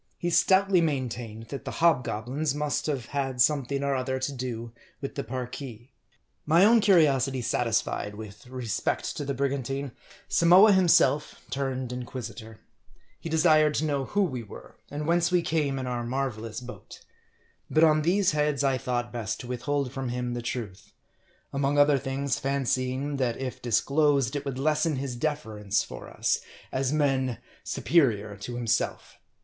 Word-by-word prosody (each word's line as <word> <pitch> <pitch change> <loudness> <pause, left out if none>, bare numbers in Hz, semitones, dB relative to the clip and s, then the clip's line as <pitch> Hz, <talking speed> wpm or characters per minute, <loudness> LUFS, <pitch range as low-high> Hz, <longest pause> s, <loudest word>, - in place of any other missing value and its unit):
He 175 - -2
stoutly 190 +1 +4
main 140 -6 0
tained 115 -1 -8
that 140 -4 -6
the - - -5
hobgoblins 135 -2 +1
must 150 +1 -1
have 135 -6 -2
had 135 -3 -2
something 140 0 +2
or 140 0 +1
other 130 0 -1
to 130 +2 -2
do 120 -3 -5 0.3
with 140 - -5
the 140 - -3
Parki. 125 -2 -6 0.5
My 165 +5 +5
own 230 +2 +6
curiosity 140 - +3
satisfied 110 -3 -1
with 105 +1 -10
respect 125 -3 -2
to - - -3
the 140 -1 -3
brigan 140 0 0
tine, 135 +2 -4 0.4
Samoa 180 +5 +6
himself 150 -6 +3 0.2
turned 130 -2 -2
inquisitor. 115 -3 -7 0.6
He 165 - -6
desired 155 -2 +4
to 155 - 0
know, 140 -3 -1
who 205 +9 +1
we 130 -10 -2
were; 105 - -12
and 150 +1 -4
whence 170 +1 +2
we 180 -1 +3
came 150 -5 0
in 130 - -3
our 120 -1 -2
marvelous 120 -3 -3
boat. 125 0 -11 0.6
But 155 - +3
on 155 -1 +5
these 185 +4 +2
heads 150 -2 0
I 135 -2 +2
thought 120 0 -2
best 110 -4 -3
to 125 - -9
withhold 130 +2 -2
from 135 -1 -4
him 125 0 -3
the 120 - -3
truth; 115 -5 -6 0.6
among 140 +1 0
other 145 -1 +5
things, 135 0 -2
fancying 135 +1 -1
that 125 -3 0
if 130 -2 -5
disclosed, 140 +3 +2
it 145 0 -3
would 135 -2 -3
lessen 155 +2 +1
his 130 -1 -4
deference 110 -8 -1
for - - -9
us, - - 0 0.3
as 130 0 0
men 135 -5 +1 0.3
superior 110 -11 +1
to 120 +4 -6
him 120 - -3
self. 115 0 -1
135 Hz, 165 wpm, -27 LUFS, 120-150 Hz, 0.6 s, own